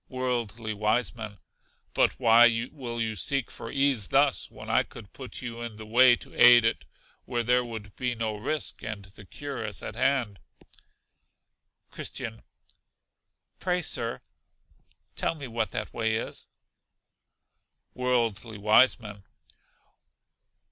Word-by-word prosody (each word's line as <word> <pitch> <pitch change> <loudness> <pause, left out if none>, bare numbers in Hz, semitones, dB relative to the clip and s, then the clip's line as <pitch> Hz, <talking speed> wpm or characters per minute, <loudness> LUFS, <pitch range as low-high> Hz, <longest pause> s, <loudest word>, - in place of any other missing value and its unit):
Worldly 120 -4 -2
Wiseman. 110 0 -1 0.6
But - - +2
why 120 0 +5
will 120 -6 -6
you 110 -1 -1
seek 135 +6 -1
for 115 - -8
ease 135 -7 +2
thus, 140 0 +2
when - - -11
I - - +4
could 100 - -11
put 130 -1 -8
you 120 -1 -6
in 120 -2 -6
the 110 0 -9
way 120 +3 +6
to - - -12
aid 120 -1 +8
it 85 -12 0 0.4
where 120 -1 -1
there 125 +1 +3
would 110 -3 -8
be 125 -1 -2
no 110 -2 -2
risk; 150 +9 -2
and 105 -3 -5
the 95 +1 -14
cure 140 +5 -6
is 105 -1 -5
at - - -5
hand. 125 -8 +1 1.5
Christian. 110 -1 -5 1.2
Pray, 180 -1 0
Sir, 115 -5 -1 0.9
tell - - 0
me 140 -4 -7
what 115 -2 -2
that - - -5
way 110 -1 0
is. 110 - -5 1.5
Worldly 115 -3 -1
Wiseman. 105 -1 +3
115 Hz, 125 wpm, -27 LUFS, 110-125 Hz, 1.5 s, aid